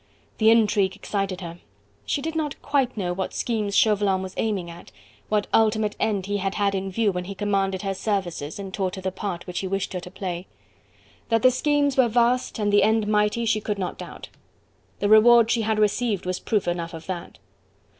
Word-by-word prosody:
The 220 Hz, 0 st, +5 dB
intrigue 210 Hz, -4 st, +3 dB
excited 195 Hz, -2 st, -3 dB
her. 170 Hz, -1 st, -8 dB, 0.5 s
She 280 Hz, -, -1 dB
did 325 Hz, +1 st, -3 dB
not 300 Hz, -3 st, -2 dB
quite 270 Hz, -4 st, 0 dB
know 180 Hz, -3 st, -1 dB
what 190 Hz, +1 st, -4 dB
schemes 215 Hz, -4 st, -1 dB
Chauvelin 200 Hz, -3 st, +3 dB
was 190 Hz, 0 st, -7 dB
aiming 200 Hz, -6 st, -1 dB
at, 170 Hz, +1 st, -13 dB, 0.4 s
what 210 Hz, -1 st, +1 dB
ultimate 215 Hz, -1 st, +2 dB
end 205 Hz, -4 st, 0 dB
he 205 Hz, +1 st, -1 dB
had 195 Hz, 0 st, -2 dB
had 200 Hz, -1 st, +1 dB
in 195 Hz, 0 st, -2 dB
view 215 Hz, +1 st, +1 dB
when 180 Hz, -1 st, -4 dB
he 200 Hz, +2 st, -7 dB
commanded 195 Hz, -1 st, -1 dB
her 195 Hz, -1 st, -1 dB
services 185 Hz, -7 st, -3 dB
and 195 Hz, -1 st, -7 dB
taught 190 Hz, -2 st, -2 dB
her 190 Hz, -, -7 dB
the 190 Hz, -, -1 dB
part 185 Hz, -2 st, -5 dB
which 180 Hz, -1 st, -4 dB
he 190 Hz, -, -3 dB
wished 195 Hz, +1 st, -2 dB
her 180 Hz, -, -2 dB
to 180 Hz, -, -10 dB
play. 185 Hz, -1 st, -5 dB, 0.8 s
That 225 Hz, -1 st, +2 dB
the 255 Hz, -, +7 dB
schemes 285 Hz, +1 st, +1 dB
were 260 Hz, -2 st, +5 dB
vast 240 Hz, +2 st, +1 dB
and 205 Hz, -2 st, 0 dB
the 205 Hz, -, +6 dB
end 220 Hz, 0 st, +3 dB
mighty, 210 Hz, +2 st, +1 dB
she 215 Hz, -1 st, +1 dB
could 205 Hz, -1 st, -2 dB
not 185 Hz, -2 st, -4 dB
doubt. -, -, -9 dB, 0.7 s
The 205 Hz, -, 0 dB
reward 230 Hz, +2 st, +6 dB
she 230 Hz, -, +2 dB
had 220 Hz, 0 st, 0 dB
received 215 Hz, -1 st, +1 dB
was 185 Hz, 0 st, -2 dB
proof 210 Hz, -5 st, -1 dB
enough 170 Hz, -1 st, -2 dB
of 160 Hz, 0 st, -10 dB
that. 180 Hz, -2 st, -6 dB
205 Hz, 205 wpm, -24 LUFS, 190-220 Hz, 0.8 s, the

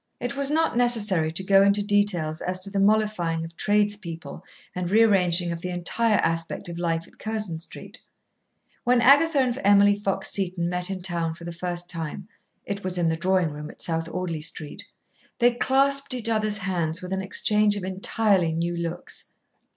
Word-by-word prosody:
It 245 Hz, +2 st, -3 dB
was 280 Hz, 0 st, +3 dB
not 320 Hz, -1 st, +1 dB
necessary 210 Hz, -10 st, +2 dB
to 180 Hz, +4 st, -1 dB
go 195 Hz, 0 st, +5 dB
into 200 Hz, +1 st, +3 dB
details 185 Hz, -7 st, +1 dB
as 185 Hz, 0 st, 0 dB
to 195 Hz, +1 st, -2 dB
the 200 Hz, -, -1 dB
mollifying 195 Hz, -6 st, +1 dB
of 165 Hz, 0 st, -12 dB
tradespeople 205 Hz, -5 st, -1 dB, 0.3 s
and 180 Hz, -1 st, -3 dB
rearranging 185 Hz, -5 st, +3 dB
of 165 Hz, 0 st, -5 dB
the 180 Hz, -, -4 dB
entire 205 Hz, +5 st, +1 dB
aspect 165 Hz, +3 st, -2 dB
of 170 Hz, 0 st, -6 dB
life 165 Hz, -1 st, -2 dB
at -, -, -23 dB
Curzon 215 Hz, -7 st, -4 dB
Street. 165 Hz, -, -9 dB, 0.8 s
When 245 Hz, 0 st, +3 dB
Agatha 285 Hz, +6 st, +5 dB
and 255 Hz, -2 st, +1 dB
Emily 205 Hz, 0 st, +5 dB
Fox 200 Hz, -1 st, -1 dB
Seton 180 Hz, -3 st, +1 dB
met 180 Hz, +1 st, -2 dB
in 190 Hz, -2 st, -5 dB
town 170 Hz, -3 st, -1 dB
for 170 Hz, -, -13 dB
the 170 Hz, -, -6 dB
first 175 Hz, 0 st, -5 dB
time 170 Hz, +2 st, -5 dB, 0.4 s
it 200 Hz, 0 st, -5 dB
was 185 Hz, -1 st, -2 dB
in 170 Hz, -2 st, +1 dB
the 160 Hz, -, 0 dB
drawing 185 Hz, -1 st, +1 dB
room 150 Hz, +1 st, -8 dB
at -, -, -9 dB
South 165 Hz, -1 st, -2 dB
Audley 170 Hz, -3 st, -4 dB
Street 155 Hz, -1 st, -5 dB, 0.5 s
they 240 Hz, 0 st, +4 dB
clasped 275 Hz, +2 st, +1 dB
each 235 Hz, -2 st, -3 dB
other's 215 Hz, -1 st, 0 dB
hands 180 Hz, -3 st, -2 dB
with 180 Hz, +1 st, -5 dB
an 190 Hz, -, -1 dB
exchange 205 Hz, +2 st, +2 dB
of 200 Hz, -, -5 dB
entirely 190 Hz, -2 st, +1 dB
new 170 Hz, +1 st, -2 dB
looks. 170 Hz, +1 st, -5 dB
185 Hz, 180 wpm, -25 LUFS, 170-210 Hz, 0.8 s, go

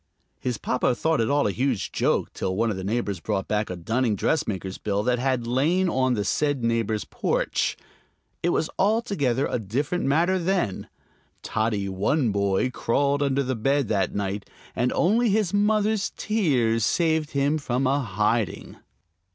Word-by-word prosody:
His 125 Hz, -3 st, -2 dB
papa 125 Hz, -1 st, 0 dB
thought 160 Hz, +1 st, +1 dB
it 115 Hz, -, 0 dB
all 145 Hz, 0 st, +2 dB
a 100 Hz, -, +2 dB
huge 125 Hz, 0 st, -1 dB
joke -, -, 0 dB
till 95 Hz, -, -2 dB
one 115 Hz, +2 st, +1 dB
of -, -, -3 dB
the 95 Hz, -, -5 dB
neighbors 100 Hz, -2 st, -2 dB
brought 95 Hz, +1 st, -2 dB
back 105 Hz, 0 st, -1 dB
a 90 Hz, -, -3 dB
dunning 115 Hz, +6 st, 0 dB
dressmaker's 95 Hz, -, -1 dB
bill 100 Hz, -1 st, -1 dB
that 125 Hz, +1 st, +1 dB
had 130 Hz, -2 st, 0 dB
lain 155 Hz, +10 st, +2 dB
on 130 Hz, -3 st, +1 dB
the 105 Hz, -2 st, -2 dB
said 145 Hz, -2 st, 0 dB
neighbor's 115 Hz, -2 st, 0 dB
porch. -, -, -1 dB, 0.6 s
It 175 Hz, -, +1 dB
was 160 Hz, -, +1 dB
altogether 190 Hz, -, +1 dB
a -, -, -1 dB
different 140 Hz, -, -2 dB
matter 170 Hz, +7 st, +2 dB
then. 175 Hz, -, -1 dB, 0.6 s
Toddy 110 Hz, -2 st, -1 dB
One 105 Hz, +7 st, +1 dB
Boy 100 Hz, +4 st, +1 dB
crawled 140 Hz, +4 st, 0 dB
under 140 Hz, -1 st, +1 dB
the 130 Hz, 0 st, -1 dB
bed 135 Hz, +2 st, 0 dB
that 95 Hz, -4 st, 0 dB
night, 100 Hz, 0 st, -3 dB, 0.3 s
and 125 Hz, -, +1 dB
only 225 Hz, +6 st, +3 dB
his 205 Hz, -3 st, +1 dB
mother's 210 Hz, 0 st, +2 dB
tears 130 Hz, -, +1 dB
saved 160 Hz, -, +1 dB
him 140 Hz, +2 st, +1 dB
from 130 Hz, -1 st, -1 dB
a 135 Hz, +2 st, +2 dB
hiding. 105 Hz, -2 st, -1 dB
125 Hz, 165 wpm, -25 LUFS, 105-155 Hz, 0.6 s, only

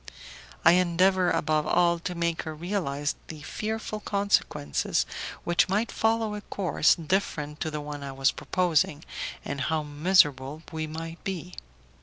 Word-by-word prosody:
I 165 Hz, -, +9 dB
endeavour 180 Hz, +1 st, +3 dB
above 155 Hz, -2 st, +1 dB
all 170 Hz, -1 st, +3 dB
to 180 Hz, +1 st, -4 dB
make 170 Hz, -1 st, 0 dB
her 160 Hz, -1 st, -6 dB
realize 155 Hz, -5 st, -2 dB
the 155 Hz, -2 st, -9 dB
fearful 215 Hz, +5 st, -4 dB
consequences 200 Hz, -, 0 dB, 0.4 s
which 175 Hz, +2 st, +2 dB
might 210 Hz, +5 st, +1 dB
follow 225 Hz, -1 st, +1 dB
a 210 Hz, -, -5 dB
course 180 Hz, -7 st, +2 dB
different 155 Hz, -4 st, -2 dB
to 160 Hz, -, -1 dB
the 150 Hz, -1 st, -4 dB
one 145 Hz, 0 st, -6 dB
I 140 Hz, -, -5 dB
was 135 Hz, 0 st, +2 dB
proposing, 165 Hz, -4 st, 0 dB, 0.4 s
and 140 Hz, -1 st, -3 dB
how 155 Hz, +3 st, 0 dB
miserable 150 Hz, -2 st, +2 dB
we 160 Hz, -1 st, -3 dB
might 165 Hz, +2 st, -7 dB
be. 180 Hz, -2 st, -4 dB
165 Hz, 145 wpm, -27 LUFS, 150-185 Hz, 0.4 s, I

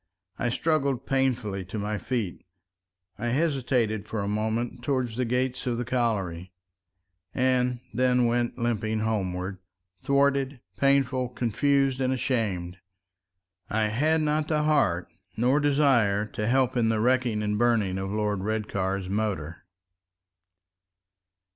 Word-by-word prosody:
I 120 Hz, -, +1 dB
struggled 140 Hz, -1 st, 0 dB
painfully 125 Hz, -8 st, 0 dB
to 95 Hz, +5 st, -6 dB
my 105 Hz, 0 st, -2 dB
feet. 115 Hz, -9 st, -3 dB, 0.8 s
I 120 Hz, -, -2 dB
hesitated 125 Hz, -6 st, 0 dB
for 110 Hz, -, -3 dB
a -, -, -3 dB
moment 110 Hz, +4 st, -2 dB
towards 125 Hz, -4 st, -1 dB
the 125 Hz, +1 st, 0 dB
gates 125 Hz, +1 st, -1 dB
of 120 Hz, -1 st, 0 dB
the 120 Hz, -, -2 dB
colliery, 100 Hz, -8 st, -1 dB, 0.8 s
and 125 Hz, -1 st, +1 dB
then 125 Hz, +1 st, +3 dB
went 120 Hz, 0 st, 0 dB
limping 110 Hz, -2 st, -1 dB
homeward, 95 Hz, -3 st, -2 dB, 0.4 s
thwarted, 140 Hz, 0 st, +1 dB, 0.2 s
painful, 135 Hz, -2 st, +2 dB
confused, 135 Hz, +3 st, +1 dB
and 130 Hz, 0 st, +1 dB
ashamed. 100 Hz, -9 st, -1 dB, 0.9 s
I 110 Hz, 0 st, +1 dB
had 155 Hz, +8 st, +2 dB
not 150 Hz, 0 st, +1 dB
the 150 Hz, -1 st, +1 dB
heart 130 Hz, -, +2 dB, 0.3 s
nor 125 Hz, +5 st, +3 dB
desire 135 Hz, -9 st, +3 dB
to 105 Hz, 0 st, -4 dB
help 130 Hz, +1 st, +2 dB
in 115 Hz, -2 st, +2 dB
the 110 Hz, -1 st, +1 dB
wrecking 120 Hz, -2 st, +1 dB
and 105 Hz, 0 st, -1 dB
burning 110 Hz, -6 st, +2 dB
of 95 Hz, 0 st, -3 dB
Lord 105 Hz, -1 st, -1 dB
Redcar's 100 Hz, -2 st, -2 dB
motor. 95 Hz, -7 st, -3 dB
120 Hz, 125 wpm, -27 LUFS, 105-130 Hz, 0.9 s, then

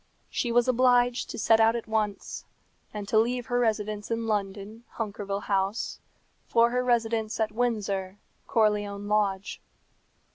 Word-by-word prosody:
She 240 Hz, -, -1 dB
was 240 Hz, +1 st, +3 dB
obliged 245 Hz, -1 st, +3 dB
to -, -, -6 dB
set 225 Hz, 0 st, +4 dB
out 225 Hz, +1 st, +4 dB
at 235 Hz, -, -4 dB
once, 215 Hz, -2 st, -2 dB, 0.5 s
and 205 Hz, -1 st, -6 dB
to 215 Hz, -, +3 dB
leave 245 Hz, +2 st, 0 dB
her 245 Hz, +2 st, 0 dB
residence 215 Hz, -3 st, -1 dB
in 230 Hz, 0 st, -1 dB
London, 205 Hz, +1 st, -3 dB
Hunkerville 205 Hz, -2 st, -3 dB
House, 195 Hz, +2 st, -1 dB, 0.5 s
for 235 Hz, 0 st, +4 dB
her 250 Hz, 0 st, +1 dB
residence 230 Hz, -2 st, 0 dB
at 220 Hz, -1 st, +1 dB
Windsor, 205 Hz, -5 st, -1 dB, 0.3 s
Corleone 205 Hz, -2 st, +1 dB
Lodge. 205 Hz, -2 st, 0 dB
220 Hz, 140 wpm, -27 LUFS, 205-235 Hz, 0.5 s, set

